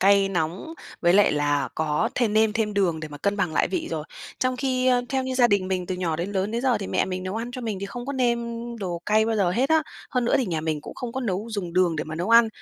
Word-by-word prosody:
cay 195 0 +5
nóng 180 - -2 0.3
với 175 0 +4
lại 205 +1 +5
là 145 -3 +1
có 150 -1 0
thêm 235 -4 +1
nêm 220 0 +3
thêm 215 -2 -1
đường 175 -5 +1
để 155 - -6
mà 145 -1 -9
cân 200 +5 0
bằng 180 -5 0
lại - - +2
vị 190 - -2
rồi, 155 -2 -3 0.3
trong 255 0 0
khi, 255 -1 0
ơ, 250 -1 +4
theo 265 -1 0
như 260 0 -3
gia 250 -1 +5
đình 200 -4 +1
mình 180 -2 -1
từ 185 - -2
nhỏ 175 -3 -1
đến 180 +5 -3
lớn 195 +1 0
đến 235 +2 -2
giờ 250 -5 +2
thì 195 - -5
mẹ - - +1
mình 185 0 -4
nấu 185 +3 -4
ăn 235 +2 -4
cho 255 0 -6
mình 220 -5 -3
thì 200 - -3
không 240 +5 -7
có 280 - -2
nêm 245 -3 +2 0.4
đồ 175 -4 -4
cay 215 +1 +3
bao 225 -1 0
giờ 190 -4 +2
hết 250 +9 +1
á. 320 0 +4 0.3
Hơn 250 -3 0
nữa - - +2
thì 260 - 0
nhà 165 -4 -1
mình 155 -2 -2
cũng - - -9
không 240 -2 -5
có 265 - -3
nấu 205 -3 -2
dùng 195 -6 -4
đường 180 -2 +2
để 150 - -2
mà 155 - -6
nấu 175 +7 -2
ăn, 230 -1 +7
200 Hz, 300 wpm, -25 LUFS, 175-240 Hz, 0.4 s, ăn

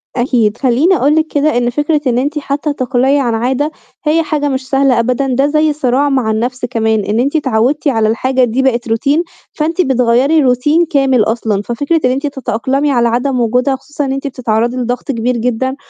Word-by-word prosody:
أكيد. 240 -3 +1
خلّيني 275 +8 +2
أقول 290 -1 +2
لِك 315 0 +1
كده 295 -3 0
إن 240 0 +1
فكرة 295 +4 0
إن 240 -1 +1
أنتِ 295 +4 -1
حتّى 285 +1 -2
تقلعي 265 +1 +1
عن 245 -4 0
عادة 260 +6 -1 0.3
هي 320 +2 +2
حاجة 295 -2 -1
مش 260 -1 -4
سهلة 270 -3 +2
أبدًا، 250 +3 0
ده 265 +2 +1
زي 305 +1 +1
صراع 280 0 0
مع 255 -5 0
النفْس 245 +3 -2
كمان، 220 -3 0
إن 215 +2 -1
أنتِ 280 +5 0
اتعوّدتِ 270 +1 0
على 225 -5 +2
الحاجة 255 +4 +1
دي 245 +2 0
بقت 240 -3 0
routine، 280 +8 +1 0.3
فأنتِ 325 +4 -1
بتغيَّري 260 +3 +2
routine 295 +7 +2
كامل 270 -5 +2
أصلًا، 220 -2 -1
ففكرة 285 +9 -1
إن 250 - +3
أنتِ 275 +3 -2
تتأقلمي 270 +1 -1
على 240 -2 +2
عدم 250 +3 0
وجودها 250 +4 +1
خصوصًا 290 +2 -5
إن 265 - -2
أنتِ 275 +1 -4
بتتعرَّضي 240 -1 -1
لضغط 245 0 -2
كبير 240 0 -1
جدًا، 250 +3 -1
260 Hz, 195 wpm, -14 LUFS, 240-285 Hz, 0.3 s, إن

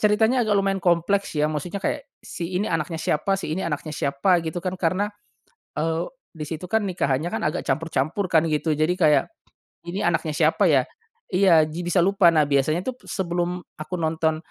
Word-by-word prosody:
ceritanya 220 +4 +3
agak 205 -1 +2
lumayan 195 -1 +1
kompleks 175 +1 +1
ya 150 - +2
maksudnya 155 +6 -4
kayak, 285 0 -2 0.2
si 175 +1 -5
ini 200 - 0
anaknya 165 0 -1
siapa 160 +5 0
si 170 -5 -4
ini 185 - -2
anaknya 155 -2 -3
siapa, 145 +6 +1
gitu 165 +1 -5
kan 185 - -1
karena, 190 +5 0 0.7
eee, 165 +6 -1 0.3
di 155 - -4
situ 165 +4 -6
kan 220 -1 +1
nikahannya 160 -4 -1
kan - - -2
agak 150 - -2
campur-campur 165 +4 -1
kan 165 -1 +4
gitu, 155 0 0
jadi 155 +4 +2
kayak, 150 -4 +5 0.6
ini 190 +4 -3
anaknya 165 -3 0
siapa 165 +5 +3
ya? 135 -4 +4 0.5
Iya 180 -4 +5
ji 155 +3 -6
bisa 175 0 +2
lupa 195 -1 +4
nah 155 -2 +4
biasanya 145 +5 +1
tuh 260 - -2
p - - -20
sebelum 175 -1 -2 0.2
aku 170 +4 -5
nonton 160 0 0
170 Hz, 185 wpm, -24 LUFS, 155-190 Hz, 0.7 s, kayak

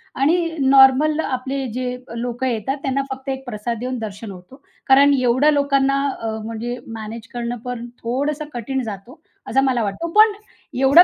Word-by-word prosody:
आणि 335 +6 +2
नॉर्मल 270 +3 +5
आपले 270 -1 -2
जे 250 0 -2 0.2
लोकं 245 +2 -2
येतात 245 +3 -1
त्यांना 275 0 0
फक्त 265 +1 -6
एक 265 0 -4
प्रसाद 235 0 -4
देऊन 255 +1 -3
दर्शन 215 -1 -6
होतो. 190 +9 -13 0.3
कारण 280 +2 +6
एवढया 255 +4 +3
लोकांना 275 -1 +2 0.2
अ, 225 - -3 0.2
म्हणजे 230 +2 -4
मॅनेज 225 0 -7
करणं 240 0 -3
पण 245 -1 -4 0.2
थोडंसं 285 +6 -1
कठीण 260 +3 -2
जातो, 225 +6 -8 0.3
असं 270 - +3
मला 255 -3 +1
वाटतो. 205 +11 -3
पण 430 +1 +7 0.5
एवढं 275 +6 +8
260 Hz, 160 wpm, -21 LUFS, 235-275 Hz, 0.5 s, एवढं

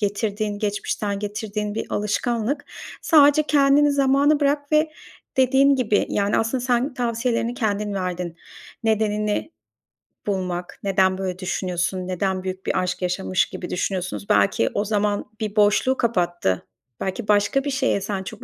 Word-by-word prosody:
getirdiğin 205 0 -1
geçmişten 205 -1 -2
getirdiğin 210 0 -4
bir 225 - -3
alışkanlık. 235 +6 -1 0.4
Sadece 300 -1 +6
kendini 290 0 +4
zamana 280 +2 +3
bırak 285 +1 0
ve 305 +1 +3 0.5
dediğim 265 +2 +4
gibi, 215 -5 +1
yani 200 0 +1
aslında 230 +3 0
sen 250 +2 +1
tavsiyelerini 235 -1 -1
kendin 210 -3 -1
verdin. 180 -3 -3 0.5
Nedenini 210 +4 0 0.8
bulmak, 180 -3 -3
neden 190 -1 +2
böyle 185 -1 -4
düşünüyorsun, 185 0 -2
neden 185 0 -1
büyük 190 0 -5
bir - - +1
aşk 185 0 -2
yaşamış 180 +1 0
gibi 175 - -7
düşünüyorsunuz. 185 +1 -3
Belki 195 - +3
o 205 - 0
zaman 205 -1 0
bir 215 -1 -3
boşluğu 210 +5 +3
kapattı. 175 - 0 0.3
Belki 195 +3 -3
başka 210 +6 +3
bir 290 - -2
şeye 265 -7 +1
sen 195 -1 -3
çok - - -9
210 Hz, 135 wpm, -23 LUFS, 190-250 Hz, 0.8 s, Sadece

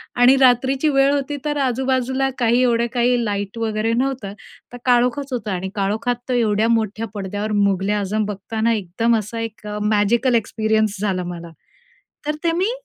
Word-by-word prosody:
आणि 245 +2 +6
रात्रीची 260 +3 +3
वेळ 275 0 +3
होती, 285 +1 -2
तर 295 0 -1
आजू-बाजूला 260 +1 0
काही 240 +1 +3
एवढं 235 -1 +2
काही 245 0 +2
लाईट 205 0 -3
वगैरे 220 0 -1
नव्हतं, 250 -5 -2 0.4
तर 245 - -6
काळोखच 250 +2 +2
होतं. 215 -4 -3
आणि 190 0 -3
काळोखात 215 +5 0
तर 255 - +1
एवढ्या 220 -2 +2
मोठ्या 225 -1 0
पडद्यावर 205 +2 -4 0.2
मुघल-ए-आझम 205 +2 0
बघताना 220 +3 -1
एकदम 220 +3 0
असा 215 +2 -6
एक 220 -2 -7
अ, 210 0 -4
मॅजिकल 220 +4 +2
एक्सपिरियन्स 220 -1 0
झाला 190 -3 -1
मला. 170 -1 -9 0.8
तर 300 - 0
ते 335 - +2
मी 430 +5 +1
230 Hz, 160 wpm, -20 LUFS, 210-250 Hz, 0.8 s, आणि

